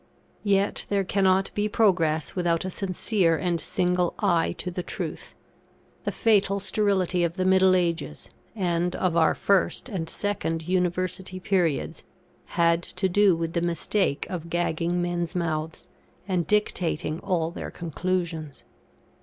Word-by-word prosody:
Yet, 200 -1 +1
there 200 -1 +1
cannot 190 0 +2
be 210 0 0
progress 165 -8 +2
without 175 -2 0
a 185 - -3
sincere 185 -2 +1
and 170 -2 -1
single 180 +2 0
eye 165 -1 +2
to 180 - -5
the 180 - -3
truth. - - -6 0.7
The - - 0
fatal 200 -3 +2
sterility 195 -3 +1
of 170 -1 0
the 185 -1 -1
middle 190 0 +5
ages, 170 - -1 0.3
and 175 -3 0
of 180 -3 0
our 160 -1 +4
first 200 +5 +1
and 170 -7 -4
second 165 -6 -2
University 185 +1 -1
periods, 180 -5 0 0.5
had 170 0 +4
to 190 +2 -2
do 195 0 +4
with 165 0 -3
the 170 - 0
mistake 170 -1 0
of 170 -2 -6
gagging 175 +1 0
men's 175 -1 -2
mouths, 160 -2 -3 0.4
and 180 -4 0
dictating 170 -6 0
all 165 -3 -1
their - - -6
conclusions. 170 -3 -3
180 Hz, 135 wpm, -26 LUFS, 165-190 Hz, 0.7 s, middle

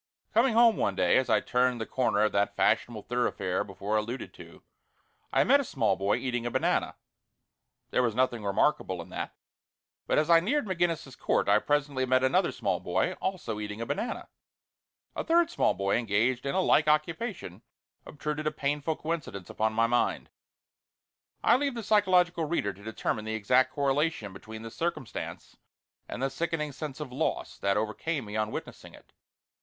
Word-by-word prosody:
Coming 230 +1 +3
home 230 -1 +6
one 100 - 0
day, 90 -2 +3
as 130 - +1
I - - +4
turned 125 -1 +1
the 110 - -3
corner 120 -5 +1
of 110 - +2
that 100 -1 0
fashionable 110 -4 +1
thoroughfare 115 -6 -1
before 100 +2 -2
alluded 115 +4 -4
to, - - -14 0.7
I - - +4
met - - +5
a - - 0
small - - +1
boy 100 +1 +1
eating 120 -2 -2
a - - 0
banana. - - 0 1.0
There - - +2
was 115 -3 0
nothing 125 -3 +1
remarkable 100 -1 +1
in - - -17
that, - - -5 0.7
but - - +2
as 155 - +3
I 170 -1 +7
neared 265 - 0
McGinnis's 170 -8 -1
Court - - 0
I 105 +1 +5
presently 145 -1 0
met 130 0 +3
another 130 - +3
small - - -1
boy, 90 +2 0
also 170 - -3
eating 105 0 -5
a 115 - -3
banana. 145 - -3 0.9
A - - -2
third 340 0 +3
small - - +2
boy 100 0 +1
engaged 120 +4 0
in 140 - -1
a 190 - +3
like 155 -4 +3
occupation 155 - -1 0.4
obtruded 150 +1 -4
a - - +1
painful 145 +2 -1
coincidence 155 - -5
upon 110 0 0
my 115 +1 +3
mind. 120 +1 0 1.1
I 240 - +5
leave 280 -1 -1
the 230 - -4
psychological 180 -5 +3
reader 145 -11 -1
to 100 +2 -16
determine 110 0 -3
the 110 0 -2
exact 125 +5 +3
correlation 140 -6 0
between 110 +3 -9
the 115 - -7
circumstance 165 0 -5 0.5
and 130 - -4
the 135 - 0
sickening 150 +1 -2
sense 145 0 -7
of 150 -4 -6
loss 125 - -2
that 100 0 +1
overcame 115 +6 -2
me 105 0 -7
on 110 0 0
witnessing - - -8
it. - - -20
130 Hz, 175 wpm, -29 LUFS, 110-160 Hz, 1.1 s, I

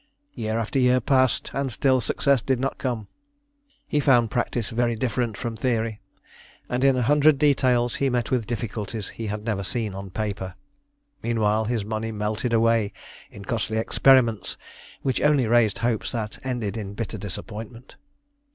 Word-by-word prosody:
Year 110 0 -2
after 115 +4 -1
year 125 0 +4
passed, 130 0 +2
and 135 -1 -1
still 130 +2 +2
success 140 +2 +2
did 130 0 0
not 135 +1 -2
come. 120 -5 -3 0.8
He 150 - +1
found 120 -6 +4
practice 120 -2 -1
very 120 0 +1
different 115 -2 -1
from 120 -1 -4
theory, 110 -2 -1 0.7
and 125 +1 -1
in 135 -1 +4
a 125 - +1
hundred 145 +3 +5
details 130 -4 +2
he 140 - +1
met 125 0 -1
with 125 -4 0
difficulties 110 -3 -4
he 115 - -6
had 105 +1 -4
never 105 -4 -1
seen 105 +1 -2
on 95 0 -7
paper. 100 -2 -4 0.7
Meanwhile 110 -2 +1
his 110 -2 -1
money 110 +1 -3
melted 105 +3 -2
away 115 -2 +2 0.4
in 100 -1 -11
costly 110 0 -1
experiments 120 -1 +3 0.5
which 130 - 0
only 145 -4 +4
raised 115 -2 +3
hopes 115 -3 0
that 110 -3 -4
ended 120 -5 -3
in 100 -2 -6
bitter 110 -1 -4
disappointment. 110 +5 -8
115 Hz, 160 wpm, -24 LUFS, 110-125 Hz, 0.8 s, hundred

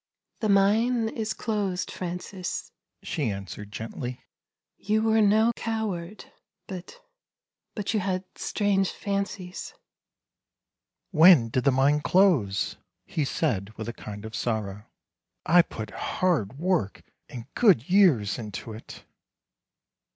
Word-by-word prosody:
The 215 - -1
mine 220 +4 +3
is 220 -1 -3
closed, 200 -5 -2
Francis," 180 +1 -5 0.3
she - - -1
answered 100 +1 -7
gently. 120 +3 -6 0.3
" - - -64
You 215 +1 +3
were 220 0 +3
no 215 +3 +4
coward, 215 -4 -4 0.4
but 185 -2 -9 0.4
— - - -60
but 210 0 -2
you 215 - +2
had 185 -1 -1
strange 195 -2 +1
fancies." 200 -2 -4 0.7
" - - -60
When 160 -8 +7
did 125 +2 -1
the 140 - +5
mine 140 +3 +3
close? 150 - +2
" - - -56
he 155 - -2
said 110 - -1
with 110 - -5
a 120 - -4
kind 105 -1 -8
of 110 - -8
sorrow; 105 -3 -3 0.3
" - - -59
I 175 +2 +7
put 110 -9 -7
hard 140 - -1
work 170 - -1 0.3
and 120 -2 -8
good 190 - +4
years 160 - +4
into 110 0 -6
it." 110 - -11
180 Hz, 130 wpm, -26 LUFS, -, 0.7 s, When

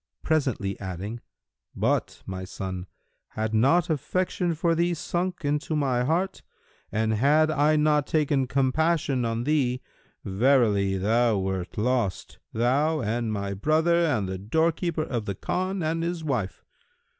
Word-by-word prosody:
presently 130 -11 0
adding, 95 +5 -5 0.6
"But, - - 0
O - - -28
my 95 -1 -5
son, 95 -1 -6 0.4
had 110 0 -3
not 140 +11 +4
affection 175 +2 -1
for 165 +2 +1
thee 170 +1 +1
sunk 175 +1 -3
into 150 +2 -1
my 130 -4 +1
heart, 175 +7 0 0.5
and 110 +1 0
had 150 +7 +3
I 150 +1 +3
not 150 -1 +2
taken 145 -4 +1
compassion 135 0 +1
on 115 +1 -1
thee, 130 -3 0 0.4
verily 100 -3 +2
thou 110 +3 +2
wert 95 -2 -3
lost, 115 -4 -1
thou 140 +7 +1
and 115 0 -1
my 100 -1 -2
brother 155 - +2
and 125 - +1
the 95 0 -4
doorkeeper 160 - 0
of 120 -7 -3
the 100 - -3
Khan 185 - -2
and 165 +1 -1
his 170 -1 -3
wife. 125 - -2
135 Hz, 140 wpm, -26 LUFS, 110-160 Hz, 0.6 s, not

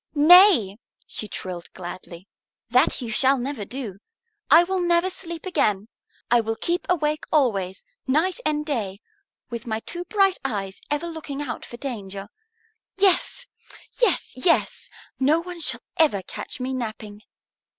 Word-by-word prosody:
"Nay!" 305 - +7 0.3
she 215 - -4
trilled 180 -4 -6
gladly. 175 0 -9 0.4
"That 255 +3 +3
you 230 - -4
shall 265 +4 +5
never 255 -4 -4
do. 230 -5 -6 0.5
I 325 +4 +8
will 380 +1 -1
never 345 +1 +2
sleep 340 -2 -7
again. 210 - 0 0.4
I 240 -1 +5
will 225 0 -2
keep 345 +9 -2
awake 305 -3 0
always, 200 - +1 0.2
night 330 - +1
and 300 0 0
day, 210 -10 -3 0.5
with 235 +1 -6
my 220 -1 -1
two 350 +7 -6
bright 390 -2 +2
eyes 200 -7 -4
ever 295 +3 -1
looking 315 -4 -6
out 280 - -5
for 240 - -9
danger. 200 -7 -6 0.7
Yes, 390 +5 +2 0.6
yes, 475 - +2
yes! 330 +6 +1 0.3
No 290 +5 +3
one 350 0 -8
shall 260 -7 +1 0.2
ever 245 -12 +3
catch - - -8
me 255 +1 -3
napping." 215 -4 -6
265 Hz, 140 wpm, -24 LUFS, 215-335 Hz, 0.7 s, I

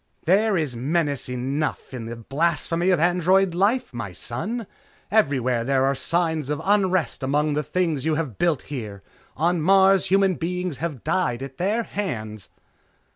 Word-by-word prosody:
"There 200 +4 +3
is 150 -7 -1
menace 145 +2 -1
enough 135 +4 -3
in 120 -3 -5
the 115 +1 -6
blasphemy 165 +7 0
of 180 -4 +3
android 180 +2 +3
life, 205 - +1
my 100 -6 -5
son. 210 - -4 0.5
Everywhere 130 - +2
there 135 +1 +2
are 135 - +2
signs 160 0 -1
of 150 0 -1
unrest 190 -6 +1
among 145 +3 +1
the 150 - 0
things 165 -4 -1
you 155 0 +1
have 150 -9 -4
built 170 -5 +1
here. 110 -8 -7 0.3
On 170 +2 +1
Mars, 190 +2 +5
human 195 -1 +3
beings 180 -2 -3
have 155 -7 -4
died 140 -7 0
at 135 -1 -8
their 210 +6 0
hands!" 110 - -5
160 Hz, 155 wpm, -23 LUFS, 130-185 Hz, 0.5 s, Mars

